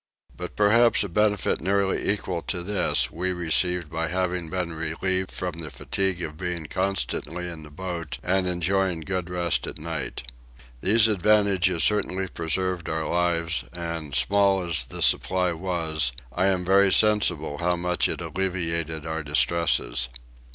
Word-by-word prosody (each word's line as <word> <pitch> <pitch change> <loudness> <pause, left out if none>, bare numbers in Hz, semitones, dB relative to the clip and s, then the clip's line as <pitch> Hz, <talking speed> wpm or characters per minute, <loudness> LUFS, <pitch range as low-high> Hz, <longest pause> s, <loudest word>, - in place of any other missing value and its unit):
But - - -7
perhaps 115 +3 +5
a 100 - -4
benefit 105 +2 +1
nearly 95 +2 0
equal 95 -4 -2
to 90 -2 -2
this 95 -1 +1
we 90 +3 -2
received 90 -1 +1
by 80 0 -2
having 90 -2 -2
been 90 -2 -2
relieved 95 +4 -2
from 90 -3 -4
the 80 -2 -5
fatigue 95 +1 -2
of 75 -1 -6
being 90 -3 -3
constantly 95 -1 -2
in 85 -2 -8
the 75 - -12
boat 85 0 -5
and 95 +1 +1
enjoying 90 0 0
good 90 +1 -3
rest 85 -2 0
at - - -5
night. 80 -4 -4 0.6
These 110 +2 +5
advantages 100 -3 +2
certainly 95 -2 +1
preserved 85 +1 -2
our 80 0 -2
lives 85 -1 0
and, 85 -5 -5
small 100 -1 +3
as 80 -7 +1
the 60 - -3
supply 90 -1 +3
was, 80 -6 -1 0.2
I 95 - +2
am 95 -2 +1
very 95 +1 +5
sensible 90 -9 +2
how 90 +1 +1
much 90 0 0
it - - -3
alleviated 85 -4 -2
our 80 0 -3
distresses. 75 -4 +1
90 Hz, 150 wpm, -25 LUFS, 80-95 Hz, 0.6 s, perhaps